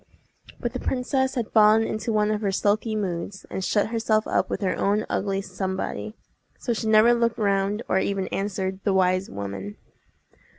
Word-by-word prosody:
But 240 -1 -3
the 255 - -3
princess 265 +1 0
had 235 -4 -2
fallen 215 0 +6
into 220 +1 -2
one 210 -1 +2
of 210 0 -1
her 200 -2 0
sulky 210 +3 +1
moods, 190 -1 -4
and 190 - -3
shut 205 +2 +1
herself 225 -1 +1
up - - 0
with - - -3
her 190 - 0
own 205 +2 +1
ugly 195 0 -1
Somebody; 190 +2 -4 0.4
so 240 - -2
she 225 0 -3
never 220 +2 +6
looked 235 -1 +1
round 200 +1 0
or 190 - +2
even 195 -1 -1
answered 190 -1 -2
the 200 - +1
wise 185 0 +2
woman. 100 0 -6
210 Hz, 175 wpm, -25 LUFS, 190-220 Hz, 0.4 s, fallen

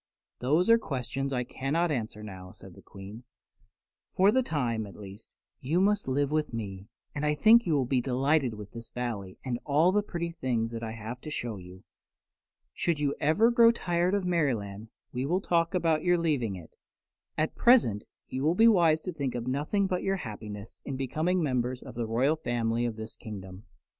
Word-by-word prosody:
"Those 150 +8 +2
are 230 0 +6
questions 135 - -3
I 125 -2 0
cannot 150 +7 -1
answer 110 -5 -3
now," 95 -3 -9
said - - -13
the - - -15
Queen. 100 +4 -11 0.9
"For 195 +2 +5
the 260 - +3
time, 120 - -1
at 100 - -12
least, 100 +1 -11 0.3
you 155 +7 0
must 205 -2 +2
live 140 +2 0
with 155 -6 -1
me, 100 -3 -6 0.3
and 145 - -4
I 150 0 +2
think 225 +7 +6
you 160 - +2
will 135 -3 +2
be 125 0 +1
delighted 135 0 +1
with 105 -1 -9
this 115 -1 -9
Valley 110 -7 -5
and 120 -2 -2
all 155 +5 +3
the 210 +2 +3
pretty 170 -4 -4
things 120 -8 -2
I 115 -1 -4
have 115 +3 -7
to - - -7
show 120 -7 -4
you. 90 0 -12 0.9
Should 170 -4 0
you 145 -1 +1
ever 160 +11 +4
grow 235 -1 +7
tired 180 -4 0
of 200 -2 -1
Merryland 115 - -1 0.2
we 130 +2 -2
will 180 +4 +1
talk 170 -1 +1
about 165 -3 +2
your 175 0 +3
leaving 140 - 0
it. 85 -3 -11 0.7
At 155 +1 0
present 230 - +4 0.2
you 130 - -4
will 155 +4 +2
be 225 +4 +6
wise 170 -7 +4
to 185 - -5
think 140 -5 -3
of 120 -1 -3
nothing 150 +10 0
but 185 -2 -1
your 195 0 0
happiness 105 - -8
in 135 -2 -4
becoming 160 +7 0
members 125 -2 -1
of 130 - -9
the 115 -1 -3
royal 130 +8 +2
family 120 -4 -1
of 115 -2 -2
this 110 0 -7
kingdom." 95 -2 -9
135 Hz, 195 wpm, -29 LUFS, 115-170 Hz, 0.9 s, grow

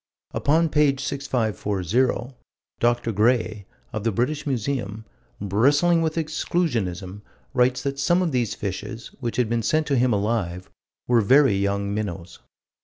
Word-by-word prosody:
Upon 160 +3 +2
page 145 -2 +2
6540, 120 - -1 0.5
Dr. 120 -1 +1
Gray, 110 -1 +1 0.3
of 110 -2 -3
the 115 - +1
British 140 +9 -1
Museum, 115 -4 -2 0.3
bristling 145 - +3
with 160 -1 -1
exclusionism, 115 - -2 0.3
writes 125 -1 +2
that 140 0 -3
some 175 +6 +3
of 170 - -1
these 120 -5 0
fishes, 105 +4 -5
which 120 -4 -3
had 125 -3 +2
been 115 +1 0
sent 155 +7 +1
to 145 - 0
him 125 0 +3
alive, 100 -4 -1 0.4
were 120 -2 +4
"very 135 +3 +5
young 100 +1 -1
minnows." 95 -5 -5
120 Hz, 135 wpm, -24 LUFS, 100-140 Hz, 0.5 s, very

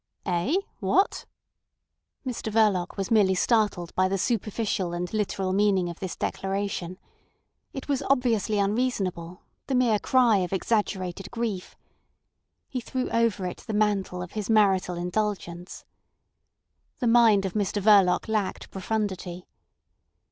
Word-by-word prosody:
"Eh? 180 - 0 0.2
What!" 390 - +1 1.0
Mr 240 -3 -4
Verloc 205 -5 +2
was 195 +1 -3
merely 200 -4 +4
startled 205 -5 +1
by 185 0 +2
the 195 +1 -1
superficial 210 -4 -1
and 175 +2 -4
literal 195 -3 -1
meaning 195 -3 +2
of 170 - -8
this 190 -2 -5
declaration. 195 -2 -3 0.7
It 270 - -7
was 280 -3 0
obviously 230 -6 +2
unreasonable, 200 -5 -1 0.2
the 270 - 0
mere 235 -4 +3
cry 245 -4 +4
of 180 -1 -2
exaggerated 195 -2 -1
grief. 225 -6 -4 0.9
He 255 - -4
threw 255 +2 -3
over 230 -5 +1
it 180 - -4
the 215 - -6
mantle 200 -4 0
of 180 - -9
his 210 -1 -4
marital 195 -5 +3
indulgence. 180 -1 -3 1.1
The - - -2
mind 230 -4 +5
of 190 - -3
Mr 205 -1 -1
Verloc 200 -3 +4
lacked 215 -3 -2
profundity. 190 -3 -3
200 Hz, 125 wpm, -26 LUFS, 185-220 Hz, 1.1 s, mind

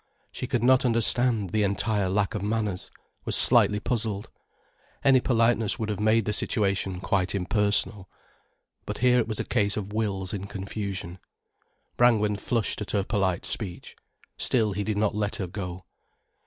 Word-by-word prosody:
She 125 - -5
could 120 -2 -1
not 130 +1 +5
understand 115 -3 +2
the 110 - +1
entire 100 0 0
lack 100 0 0
of 105 - -3
manners, 105 -2 -2 0.3
was - - 0
slightly 105 - +5
puzzled. 110 -1 -3 0.7
Any 135 -2 +5
politeness 115 -4 +2
would 110 -1 -3
have 105 - -3
made 110 0 +2
the 105 - -1
situation 100 -4 0
quite 95 0 0
impersonal. 100 +1 0 0.8
But - - -4
here 125 0 +4
it 115 - 0
was 110 -2 -3
a - - -2
case 105 -4 +1
of 105 -1 -5
wills 100 -4 -2
in 100 -1 -5
confusion. 100 -2 -5 0.8
Brangwen 105 -4 +3
flushed 110 0 -2
at 105 - -5
her 100 -2 0
polite 95 -4 -1
speech. 95 -6 -4 0.4
Still 110 -5 +1
he 100 +1 -2
did 105 0 -2
not 105 0 +1
let 105 -1 -2
her 95 - -3
go. 90 -1 -7
105 Hz, 160 wpm, -26 LUFS, 100-115 Hz, 0.8 s, not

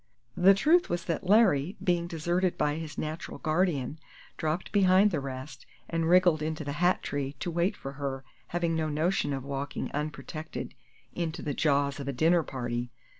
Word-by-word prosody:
The 195 +2 +6
truth 330 - +4
was 175 - -2
that 170 +1 -2
Larry, 190 -6 +4
being 175 -1 +1
deserted 175 +2 0
by 150 -1 +1
his 160 -2 -7
natural 155 +3 -4
guardian, 155 -4 0 0.4
dropped 160 +3 -2
behind 195 0 +5
the 160 - 0
rest, 135 +1 -7 0.2
and 165 -1 -1
wriggled 175 -3 +5
into 155 0 -3
the 145 - -4
hat 180 +1 +3
tree 140 -1 -3
to 175 - -3
wait 175 +5 0
for 135 - -6
her, 135 -1 -4 0.2
having 170 -1 -1
no 160 -1 0
notion 155 0 0
of 135 -2 -3
walking 140 +1 -4
unprotected 155 +1 -5 0.4
into 170 -1 -3
the 145 - -2
jaws 140 -1 +1
of 140 - -5
a 140 - -1
dinner 165 +6 +4
party. 120 -4 -4
160 Hz, 175 wpm, -29 LUFS, 140-175 Hz, 0.4 s, The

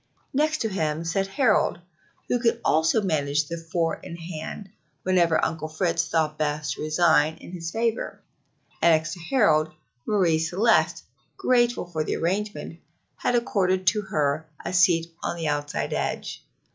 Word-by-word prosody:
Next 305 +3 +1
to 225 - +1
him 160 -4 -2
sat 195 +4 0
Harold, 215 -4 +2 0.5
who 245 - +1
could 235 -1 +1
also 160 +7 +3
manage 150 -4 +1
the 170 - -4
four 165 -2 0
in 170 - -9
hand 170 +3 -7 0.3
whenever 175 -3 +3
Uncle 160 -1 -3
Fritz 165 +1 0
thought 155 -1 0
best 150 0 -1
to - - -9
resign 155 -1 +3
in - - -12
his 170 -2 -5
favor, 225 +4 -2 0.6
and 170 -1 +6
next 160 0 -2
to - - -9
Harold, 165 - +2 0.4
Marie 180 -7 +3
Celeste, 190 +8 +2 0.3
grateful 240 -4 +2
for 165 -3 -3
the - - -2
arrangement 200 +5 -3 0.4
that 245 - +2
accorded 190 -5 +1
to 210 +3 +3
her 155 -4 -1 0.2
a - - -3
seat 175 -2 +4 0.2
on - - -2
the 165 -2 -2
outside 145 0 -2
edge. - - -3
170 Hz, 155 wpm, -25 LUFS, 155-200 Hz, 0.6 s, and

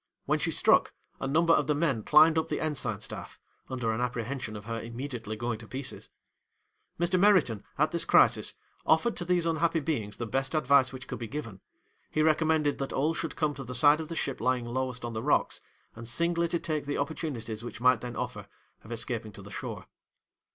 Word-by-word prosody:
When - - +1
she - - 0
struck, - - +4 0.3
a - - -2
number 165 +4 +4
of 150 - +2
the 150 - +2
men 145 -7 +1
climbed 155 +5 +6
up 160 - -3
the - - -1
ensign 135 -9 -2
staff, - - -7 0.3
under 125 -3 -1
an 110 +2 -2
apprehension 125 -1 -3
of 105 0 -8
her 115 0 -4
immediately 115 -2 -5
going 115 0 -3
to 110 - -11
pieces. 130 +2 -5 0.9
'Mr. 175 +1 +2
Meriton, 180 - +4
at 155 +2 +2
this 170 -1 +3
crisis, - - +4 0.3
offered 235 -1 +3
to - - -4
these 175 -1 +2
unhappy 165 0 +1
beings 120 -10 -2
the 120 - -3
best 135 +6 -2
advice 140 -4 +4
which 130 0 -9
could - - -5
be 115 - -5
given; 115 -8 -6 0.5
he 155 - +1
recommended 155 -1 +2
that 135 - -3
all 150 +4 +1
should 165 -2 -3
come 155 -2 0
to 135 - -7
the 125 0 -6
side 145 +5 +5
of 160 - -6
the 165 - -5
ship 135 -4 -3
lying 125 -1 +1
lowest 125 0 -3
on 120 - -4
the 110 - -3
rocks, 145 +5 +1 0.3
and 115 0 -8
singly 170 +7 +1
to 170 - 0
take 155 -4 -3
the 145 - -1
opportunities 125 -8 -4
which 120 - -7
might 125 -1 +4
then 120 -1 -6
offer, - - -5 0.4
of 105 - -12
escaping 115 -1 -2
to 100 - -12
the 100 - -11
shore. - - -6
135 Hz, 205 wpm, -29 LUFS, 115-155 Hz, 0.9 s, climbed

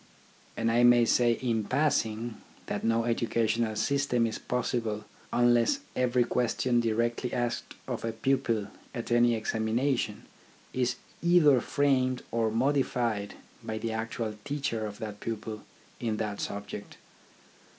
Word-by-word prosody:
And 115 0 +1
I 120 +1 +4
may 120 -1 +6
say 120 +1 +4
in 115 -3 +1
passing 115 -4 0 0.3
that - - -3
no 115 0 +2
educational 115 -1 +1
system 125 +1 +1
is 110 - -3
possible 115 -3 -2 0.3
unless 120 - +3
every 125 -1 +3
question 120 0 +1
directly 115 +2 0
asked 120 -1 -2
of - - -3
a 115 - -1
pupil 115 -3 0 0.3
at 120 -1 -5
any 120 0 +4
examination 110 +1 0 0.5
is 125 -1 +1 0.3
either 165 -7 +5
framed 130 -2 +1
or 115 -1 +1
modified 120 -4 0 0.3
by 110 - -3
the 115 +1 -3
actual 110 0 -3
teacher 140 -7 -2
of 105 -1 -8
that 105 -2 -6
pupil 110 -1 -5 0.4
in 110 -2 -1
that 105 -2 -3
subject. 100 0 -6
115 Hz, 130 wpm, -29 LUFS, 110-125 Hz, 0.5 s, may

